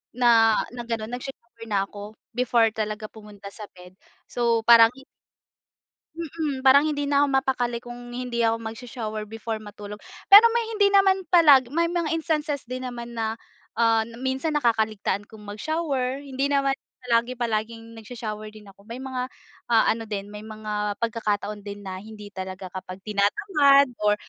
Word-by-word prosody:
na 230 -3 +5 0.2
na 245 -1 -7
gano'n, 230 -1 -4
nagsha-shower 245 -2 -9
na 200 -2 +1
ako 205 +1 -10 0.2
before 235 -3 +3
talaga 215 -1 -4
pumunta 210 -2 -12
sa 210 - -10
bed. 180 0 -15 0.4
So 235 -2 +1
parang 230 0 +8
hi 270 - -14 1.1
Mm. 310 -4 -4
Parang 280 +3 +6
hindi 290 -1 -1
na 285 0 +3
ako - - +2
mapakali 250 -3 0
kung 240 0 -9
hindi 245 -1 -4
ako 225 - +2
magsa-shower 220 -2 -6
before 225 0 -5
matulog. 210 0 -10 0.3
Pero 415 +3 +11
may 470 -1 +1
hindi 415 -2 +3
naman 390 -2 +3
palagi, 295 -8 +6
may 335 +1 +1
mga 340 -3 -1
instances 305 -3 -2
din 255 +1 -5
naman 240 -1 -7
na 220 0 -1 0.4
ah, 225 -1 +2 0.2
minsan 265 +4 -1
nakakaligtaan 220 -5 0
kong 220 -2 -14
mag-shower, 270 +4 -2
hindi 275 0 -2
naman 275 -1 +2 0.3
palagi 235 +1 +1
palaging 225 -1 -3
nagsa-shower 215 -2 -7
din 215 -1 -15
ako. 200 +2 -23
May 235 - -7
mga 255 -1 -3 0.4
ah, 230 -2 +4
ano 225 0 -4
din 205 -1 -5
may 210 - -8
mga 210 -1 -4
pagkakataon 210 -2 -2
din 205 0 -9
na 190 -1 -6
hindi 210 0 -11
talaga 190 -1 -7
kapag 185 0 -8
tinatamad 275 - +3
or 210 0 +3
230 Hz, 160 wpm, -24 LUFS, 215-265 Hz, 1.1 s, Pero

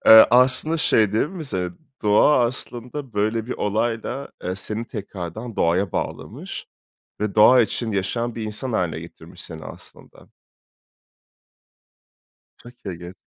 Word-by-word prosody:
Eee, 110 0 +10
aslında 130 +6 +6
şey 110 -10 +3
değil 110 - +1
mi 180 -3 -7
ze 90 -9 -3 0.3
doğa 120 +6 +4
aslında 125 +2 -5
böyle 110 +2 -1
bir 125 - -3
olayla, 115 +5 -2 0.2
ııı, 90 +1 -3
seni 110 +4 -3
tekrardan 105 +1 -7
doğaya 90 +3 +1
bağlamış - - -5 0.5
ve 105 -2 -2
doğa 120 +4 +7
için 110 0 -1
yaşayan 115 +5 -2
bir 115 - -5
insan 110 +4 -3
hâline 90 -6 -1
getirmiş - - -13
seni, 80 -1 -10
aslında. - - -13 2.3
Çok 120 - -14
ilginç. 90 -1 -7
110 Hz, 125 wpm, -22 LUFS, 100-125 Hz, 2.3 s, Eee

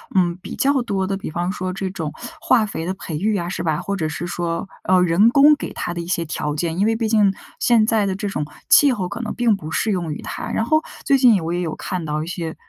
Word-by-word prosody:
嗯， 175 -2 +2
比 - - -7
较 275 -1 +2
多 200 -5 -1
的， 195 +1 -2
比 195 - -6
方 175 +3 -2
说 185 -1 -4
这 195 0 -3
种 160 -5 -5 0.3
化 240 -7 +3
肥 165 -5 -5
的 185 - -1
培 170 -5 -6
育 210 +6 0
啊， 175 -2 -2
是 185 - -4
吧？ 160 -3 -1
或 200 0 -3
者 160 -4 -1
是 160 +3 -4
说， 170 +1 -3 0.2
呃， 185 -1 +4
人 180 +5 +4
工 285 +4 +6
给 - - -6
它 175 - -4
的 170 - -5
一 170 - -5
些 175 -1 0
条 150 -2 -3
件， 165 +2 -2
因 200 - +3
为 225 +1 +2
毕 225 -1 -1
竟， 210 -3 +4 0.3
现 230 -3 +4
在 220 -2 +2
的 190 - -1
这 200 +1 -3
种 150 -6 -3 0.2
气 285 -3 +6
候 185 -5 -3
可 175 - -6
能 230 -2 -3
并 235 -4 +2
不 155 -4 -8
适 215 +7 0
用 170 -5 -2
于 - - -7
它。 - - -6
然 - - 0
后 310 +6 +2 0.2
最 275 - +4
近 250 -3 +6
也 195 - +2
我 165 +1 -3
也 175 - -1
有 165 -3 -3
看 180 -3 -4
到 150 0 -2
一 - - -8
些 170 -2 -4
185 Hz, 300 characters per minute, -21 LUFS, 170-215 Hz, 0.3 s, 工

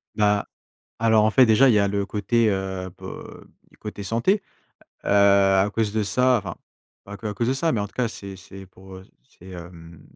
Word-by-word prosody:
Bah. 105 -1 +1 0.5
Alors 110 -1 +3
en - - +2
fait 130 +3 +5
déjà, 125 +5 +5
il 115 - +4
y - - +4
a 100 - +2
le 100 0 -1
côté, 110 +3 0
heu, 95 -1 -4
po - - -9 0.5
du - - -23
côté 105 -1 -8
santé, 120 - 0 0.6
heu, - - -3
à 100 -1 +4
cause 110 -2 0
de 110 - 0
ça 125 +5 +2
enfin, 100 - -7 0.5
pas 100 +1 -10
que 110 - -6
à 105 - -3
cause 115 +4 -1
de 130 - +1
ça, 165 +4 0
mais 105 - -1
en - - -2
tout - - -25
cas, 125 -2 -1
c'est 100 -3 -9
c'est 95 +1 -12
pour, 95 0 -15
heu, 95 - -11 0.2
c'est, 95 - -17
hem, 85 -2 -12
100 Hz, 220 wpm, -23 LUFS, 95-115 Hz, 0.6 s, fait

